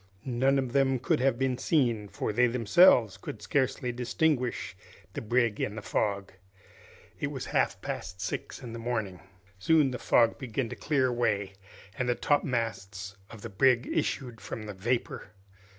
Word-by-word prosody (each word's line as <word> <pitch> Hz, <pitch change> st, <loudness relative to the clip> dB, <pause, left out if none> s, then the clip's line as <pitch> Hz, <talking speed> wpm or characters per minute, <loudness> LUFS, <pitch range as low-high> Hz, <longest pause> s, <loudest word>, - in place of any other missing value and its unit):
None 130 Hz, +2 st, +2 dB
of 130 Hz, -2 st, -2 dB
them 135 Hz, -1 st, +3 dB
could 125 Hz, -, 0 dB
have 130 Hz, -1 st, +2 dB
been 130 Hz, -1 st, 0 dB
seen, 120 Hz, -9 st, +1 dB
for 105 Hz, -, -3 dB
they 125 Hz, +3 st, +4 dB
themselves 115 Hz, -, +5 dB
could 105 Hz, -, -8 dB
scarcely 125 Hz, +3 st, 0 dB
distinguish 125 Hz, +1 st, -1 dB, 0.4 s
the -, -, -4 dB
brig 115 Hz, -1 st, +1 dB
in 105 Hz, -, -2 dB
the 110 Hz, -, -7 dB
fog. 100 Hz, -2 st, -1 dB, 0.9 s
It -, -, -1 dB
was -, -, -5 dB
half -, -, 0 dB
past 95 Hz, -, -5 dB
six 95 Hz, -, -5 dB
in 120 Hz, -2 st, -7 dB
the 115 Hz, -, -6 dB
morning. 110 Hz, -6 st, -3 dB, 0.4 s
Soon 145 Hz, +5 st, +3 dB
the 125 Hz, -, -5 dB
fog 115 Hz, -2 st, +3 dB
began 125 Hz, -2 st, -3 dB
to -, -, -6 dB
clear 140 Hz, -4 st, +1 dB
away, 110 Hz, -6 st, 0 dB, 0.5 s
and 125 Hz, -1 st, 0 dB
the 120 Hz, -, +2 dB
topmasts 115 Hz, -8 st, -1 dB
of 110 Hz, -3 st, -12 dB
the 115 Hz, -, -5 dB
brig 125 Hz, +4 st, +3 dB
issued 120 Hz, -5 st, -2 dB
from 110 Hz, -, -6 dB
the 105 Hz, -1 st, -6 dB
vapor. 115 Hz, +6 st, -3 dB
120 Hz, 165 wpm, -29 LUFS, 105-130 Hz, 0.9 s, themselves